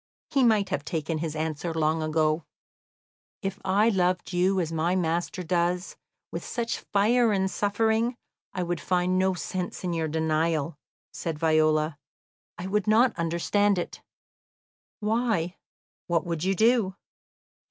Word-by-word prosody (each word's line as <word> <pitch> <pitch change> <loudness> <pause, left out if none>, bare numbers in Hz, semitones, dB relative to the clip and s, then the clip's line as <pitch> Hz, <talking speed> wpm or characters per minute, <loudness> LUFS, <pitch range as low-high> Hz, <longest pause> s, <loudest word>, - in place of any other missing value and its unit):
He 275 - +3
might 215 -5 +3
have 165 -7 -2
taken 155 +1 -2
his 160 -1 -3
answer 160 +1 -3
long 160 0 +1
ago. 155 0 +1 1.0
"If 195 0 -3
I 200 +4 +3
loved 180 -2 0
you 185 +2 +2
as 165 -3 -1
my 165 +3 +1
master 175 +1 -1
does, 175 +1 0 0.4
with - - -4
such 235 -1 -3
fire 225 +3 +2
and 190 -1 +1
suffering, 220 +4 +1 0.4
I 185 - -2
would 175 0 -2
find 180 0 +1
no 190 0 +2
sense 180 +1 -4
in 180 -1 -1
your 165 -1 -1
denial," 160 0 0 0.4
said 165 -2 -4
Viola. 155 -1 +2 0.6
"I 175 - -6
would 205 +1 0
not 225 +2 +4
understand 180 +4 +1
it." 175 - -4 1.0
"Why, 215 -5 0 0.5
what 170 -2 +1
would 170 -2 -3
you 190 +1 +1
do?" 220 -2 +3
180 Hz, 140 wpm, -27 LUFS, 160-200 Hz, 1.0 s, not